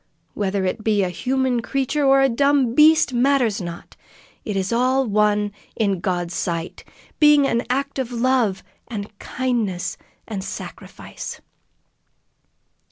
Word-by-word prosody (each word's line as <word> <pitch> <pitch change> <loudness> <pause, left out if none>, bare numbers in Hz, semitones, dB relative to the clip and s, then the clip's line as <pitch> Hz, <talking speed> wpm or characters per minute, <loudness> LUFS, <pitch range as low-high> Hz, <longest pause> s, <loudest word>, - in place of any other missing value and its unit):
Whether 195 -1 -1
it 215 +4 -2
be 210 -2 +2
a 185 - 0
human 255 +4 0
creature 275 +4 -1
or 270 0 +5
a 270 - +5
dumb 270 -1 +2
beast, 310 0 +5
matters 245 -4 +2
not. 170 -1 -8 0.5
It 205 -2 -3
is 190 +3 -1
all 255 +3 +2
one 210 -1 +1 0.2
in 200 -5 0
God's 175 -1 -2
sight, 170 -1 -3 0.4
being 295 -2 +6
an 235 -3 +1
act 275 +2 -1
of 255 -2 -3
love 240 -5 +1 0.2
and 210 -2 -6
kindness 230 -8 -2 0.3
and 200 -4 -4
sacrifice." - - -8
235 Hz, 130 wpm, -22 LUFS, 200-265 Hz, 0.5 s, being